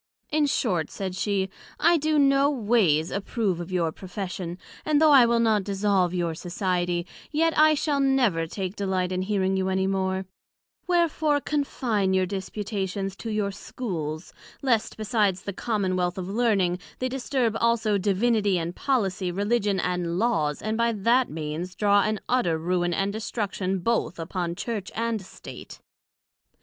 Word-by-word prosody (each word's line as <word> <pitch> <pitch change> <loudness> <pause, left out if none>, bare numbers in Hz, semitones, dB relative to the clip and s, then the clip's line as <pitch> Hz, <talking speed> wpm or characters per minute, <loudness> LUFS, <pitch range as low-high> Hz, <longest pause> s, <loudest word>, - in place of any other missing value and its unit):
In 300 -1 +2
short, 190 - 0
said 190 -2 -5
she, 195 0 0 0.3
I 340 +2 +5
do 310 0 +1
no 275 0 +4
ways 210 - +2
approve 200 -2 -1
of 175 +1 -6
your 170 -3 +1
Profession; 180 -1 -6 0.3
and 305 -1 +2
though 310 -1 +6
I 260 -4 +8
will 235 0 +2
not 220 -3 +3
dissolve 195 -2 +1
your 175 -2 -1
society, 175 0 -1 0.3
yet 325 +2 +2
I 310 0 +6
shall 290 -1 0
never 250 -12 +2
take 190 +2 -4
delight 185 -2 -1
in 185 0 -1
hearing 190 -1 0
you 190 0 0
any 190 0 +1
more; 190 0 -1 0.6
wherefore 320 -4 +2
confine 240 -10 0
your 185 0 +3
disputations 195 0 -3
to 230 - -6
your 210 -2 -1
Schools, 175 -7 -5 0.3
lest 235 -5 +1
besides 210 -4 +1
the 200 - -4
Commonwealth 185 -5 -1
of 185 -1 -4
Learning, 195 -5 +1 0.2
they 255 - -1
disturb 255 -3 -1
also 225 -3 +2
Divinity 205 0 +2
and 170 +1 -3
Policy, 200 -9 0
Religion 205 +1 0
and 175 -1 -1
Laws, 160 -9 0
and 220 +1 -1
by 235 0 +2
that 235 +5 +2
means 160 +4 -5
draw 205 0 +4
an 215 0 0
utter 240 -11 +2
ruine 175 +1 0
and 195 +1 0
destruction 205 -3 -2
both 180 -3 0
upon 170 +1 -3
Church 210 -1 -4
and 230 -2 -1
State. 190 - -11
200 Hz, 155 wpm, -26 LUFS, 180-235 Hz, 0.6 s, I